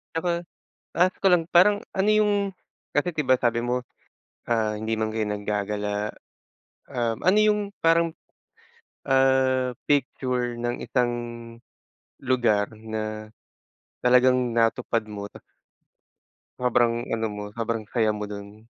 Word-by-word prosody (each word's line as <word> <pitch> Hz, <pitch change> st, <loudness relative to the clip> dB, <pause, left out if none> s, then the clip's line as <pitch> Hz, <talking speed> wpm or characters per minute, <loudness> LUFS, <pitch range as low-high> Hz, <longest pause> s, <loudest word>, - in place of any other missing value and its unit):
Ako, 170 Hz, +1 st, -1 dB, 0.5 s
ask 180 Hz, +2 st, +3 dB
ko 195 Hz, -2 st, +5 dB
lang 170 Hz, -1 st, +3 dB
parang 205 Hz, +4 st, +5 dB, 0.2 s
ano 200 Hz, +2 st, +3 dB
yung 215 Hz, -1 st, +4 dB, 0.6 s
kasi 155 Hz, +3 st, 0 dB
di 150 Hz, -, 0 dB
ba, 130 Hz, -1 st, +4 dB
sabi 120 Hz, -1 st, +1 dB
mo 125 Hz, +1 st, 0 dB, 0.7 s
ah, 110 Hz, -2 st, 0 dB
hindi 110 Hz, +1 st, -2 dB
man 110 Hz, 0 st, 0 dB
kayo 110 Hz, 0 st, -1 dB
naggagala 105 Hz, 0 st, -2 dB, 0.8 s
um, 115 Hz, -2 st, -1 dB
ano 190 Hz, +3 st, +4 dB
yung 210 Hz, 0 st, +4 dB, 0.2 s
parang, 165 Hz, 0 st, +3 dB, 0.9 s
ah, 130 Hz, -2 st, +2 dB
picture 125 Hz, -3 st, 0 dB
ng 120 Hz, +1 st, -3 dB
isang 125 Hz, -2 st, 0 dB, 1.1 s
lugar 120 Hz, -5 st, +2 dB
na 110 Hz, -1 st, -5 dB, 0.7 s
talagang 125 Hz, 0 st, +4 dB
natupad 115 Hz, 0 st, +1 dB
mo 100 Hz, -1 st, -6 dB
tas -, -, -15 dB, 1.2 s
sobrang 120 Hz, -1 st, +2 dB, 0.2 s
ano 115 Hz, -1 st, 0 dB
mo, 105 Hz, 0 st, -6 dB
sobrang 115 Hz, -1 st, -3 dB
saya 110 Hz, 0 st, +1 dB
mo 105 Hz, -1 st, -2 dB
dun? 105 Hz, +1 st, -10 dB
120 Hz, 120 wpm, -25 LUFS, 110-135 Hz, 1.2 s, ko